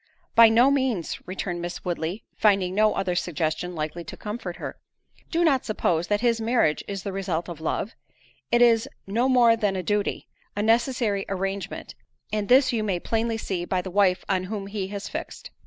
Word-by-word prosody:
"By 230 -1 +8
no 240 +5 +5
means," 260 - 0
returned 180 -1 -4
Miss 175 +2 -6
Woodley, 175 +3 -3
finding 195 -4 +3
no 215 +2 +3
other 185 -2 0
suggestion 175 0 -2
likely 155 +2 -4
to - - -8
comfort 210 -4 -5
her; - - -7 0.5
"do 340 +1 +1
not 275 -6 +3
suppose 175 -6 0
that 205 0 +1
his 235 -2 +2
marriage 225 -9 +2
is 195 -2 -5
the 200 - -3
result 180 -4 -2
of 170 -3 -8
love—it 225 +6 -3
is 230 -2 +4 0.2
no 235 +6 +1
more 240 -3 +6
than 205 -3 0
a 185 - -2
duty, 205 +2 -1 0.3
a 205 - -1
necessary 230 -3 +2
arrangement, 195 0 -4 0.4
and 210 -1 -1
this 255 0 +5
you 220 -2 0
may 190 -4 -1
plainly 225 +3 -1
see 190 -5 -3
by 185 +1 -1
the 185 +1 -5
wife 185 -2 +2
on 185 -1 0
whom 200 0 -4
he 200 -1 -4
has 200 0 -6
fixed. - - -7
200 Hz, 185 wpm, -25 LUFS, 180-230 Hz, 0.5 s, By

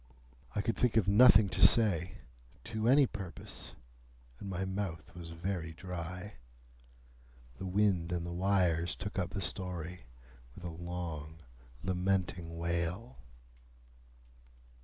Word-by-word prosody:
I 105 - +2
could 115 - 0
think 120 -2 +2
of 110 - +3
nothing 105 0 +8
to 95 +1 -3
say, 90 -4 +4 0.4
to 110 -1 -2
any 140 +3 +7
purpose, 95 -7 -7 0.6
and 100 - -6
my 95 0 -2
mouth 95 -5 -4
was 85 -1 -8
very 85 -1 -3
dry. 90 +3 -6 1.2
The 95 - -4
wind 95 -3 +2
and 85 -1 -1
the 85 - -4
wires 90 -2 +2
took 100 +1 -4
up 90 - -1
the 100 - -4
story 90 -4 -3 0.5
with 90 - -11
a 85 - -4
long 80 -2 -6 0.4
lamenting 90 -2 -1
wail. 85 +8 -2
90 Hz, 120 wpm, -33 LUFS, 85-100 Hz, 1.2 s, nothing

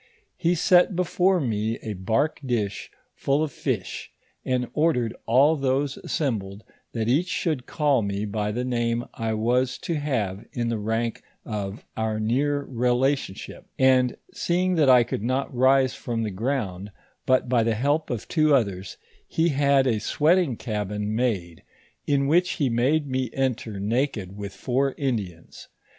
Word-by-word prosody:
He 175 0 +1
set 180 +2 +4
before 180 +1 +2
me 110 -4 -1
a 110 - -3
bark 110 +11 0
dish 110 -6 -2 0.2
full 140 +3 0
of 155 - -3
fish, - - -4 0.3
and 125 -1 0
ordered 150 -8 +1
all 135 +7 +5
those 135 0 0
assembled, 105 -8 -3 0.3
that 115 -2 -2
each 150 +9 +2
should 155 -7 -2
call 145 -5 +2
me 100 0 -2
by 105 0 -2
the 125 +4 -2
name 120 -1 -1
I 115 -1 -2
was 125 +4 +1
to 170 - -2
have 115 - -2
in 120 -1 -1
the 115 -2 -1
rank 115 +2 -2 0.2
of 105 -2 -5
our 110 -1 -1
near 140 +6 0
rela 125 +2 +2
tionship; 115 -9 -8
and 130 -1 +3 0.2
seeing 180 +2 0
that 155 -6 +3
I 125 -2 +7
could 115 - -4
not 130 +5 -1
rise 130 +1 +4
from 115 -2 -3
the 110 - -2
ground 100 -3 -3 0.4
but 130 -1 +3
by 120 -1 +3
the 115 0 +1
help 145 +7 0
of 120 -4 -4
two 155 -3 +3
othere, 100 -8 0 0.5
he 165 +1 +1
had 140 -2 +3
a 115 -4 +1
sweating 150 - +2
cabin 105 -1 -3
made, 100 -9 -1 0.5
in 140 -1 +2
which 175 +5 +3
he 140 -4 0
made 135 +6 +2
me 130 -2 -2
enter 125 -6 -2
naked 105 -3 -1
with 100 -1 -7
four 135 +1 0
Indians. 105 - -4
125 Hz, 155 wpm, -25 LUFS, 110-140 Hz, 0.5 s, I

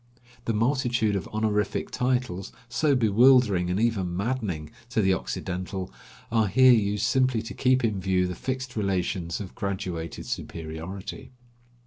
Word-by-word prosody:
The 115 - 0
multitude 120 -2 +1
of 95 - -3
honorific 105 -1 -1
titles, 125 -7 -1 0.2
so 140 +4 +2
bewildering 115 -5 +4
and 90 +3 0
even 100 -7 0
maddening 100 -9 -2 0.2
to 125 - 0
the 95 -3 +4
Occidental, 95 -2 -4 0.4
are 110 -2 +3
here 130 +5 +6
used 105 -1 +1
simply 130 -1 +2
to 115 - -7
keep 130 0 +2
in 105 -4 +1
view 95 0 +1
the 90 - -3
fixed 130 +5 -4
relations 90 -4 -1
of 100 -3 -7
graduated 90 -4 -4
superiority. 80 +8 -6
105 Hz, 135 wpm, -26 LUFS, 95-125 Hz, 0.4 s, here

